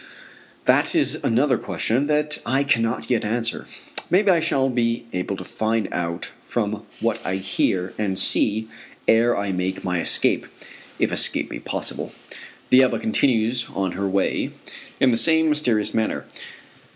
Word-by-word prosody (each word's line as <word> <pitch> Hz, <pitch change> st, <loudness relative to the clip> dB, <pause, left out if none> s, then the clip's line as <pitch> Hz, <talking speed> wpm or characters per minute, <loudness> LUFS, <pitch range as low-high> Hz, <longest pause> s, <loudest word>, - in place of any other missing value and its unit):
That -, -, +3 dB
is -, -, +1 dB
another 130 Hz, +2 st, +2 dB
question 130 Hz, +6 st, -1 dB
that 150 Hz, 0 st, 0 dB
I 135 Hz, +4 st, +1 dB
cannot 115 Hz, -3 st, 0 dB
yet 120 Hz, -, +2 dB
answer. 115 Hz, +2 st, -2 dB, 0.4 s
Maybe 195 Hz, +2 st, +4 dB
I 170 Hz, -, +4 dB
shall 135 Hz, -4 st, +1 dB
be 120 Hz, -2 st, 0 dB
able 90 Hz, +2 st, -2 dB
to 90 Hz, -, -6 dB
find 110 Hz, +2 st, -1 dB
out 85 Hz, -1 st, -3 dB
from 110 Hz, -2 st, -3 dB
what 115 Hz, 0 st, -1 dB
I 95 Hz, -, -1 dB
hear 95 Hz, -1 st, -1 dB
and 100 Hz, -3 st, -1 dB
see 110 Hz, +3 st, +3 dB, 0.4 s
ere 115 Hz, +2 st, +4 dB
I 100 Hz, -1 st, -1 dB
make 95 Hz, +1 st, -2 dB
my 90 Hz, -2 st, 0 dB
escape, -, -, +1 dB, 0.5 s
if -, -, +1 dB
escape -, -, +1 dB
be -, -, -5 dB
possible. -, -, -4 dB, 0.6 s
The 130 Hz, +1 st, +8 dB
Ebba 130 Hz, -, +2 dB
continues 125 Hz, -, +1 dB
on 95 Hz, -2 st, 0 dB
her 100 Hz, +2 st, -2 dB
way 95 Hz, 0 st, 0 dB, 0.5 s
in 130 Hz, -, +5 dB
the 115 Hz, -, +2 dB
same 160 Hz, +4 st, +3 dB
mysterious 125 Hz, -8 st, +1 dB
manner. 110 Hz, -1 st, -1 dB
115 Hz, 150 wpm, -23 LUFS, 100-130 Hz, 0.6 s, The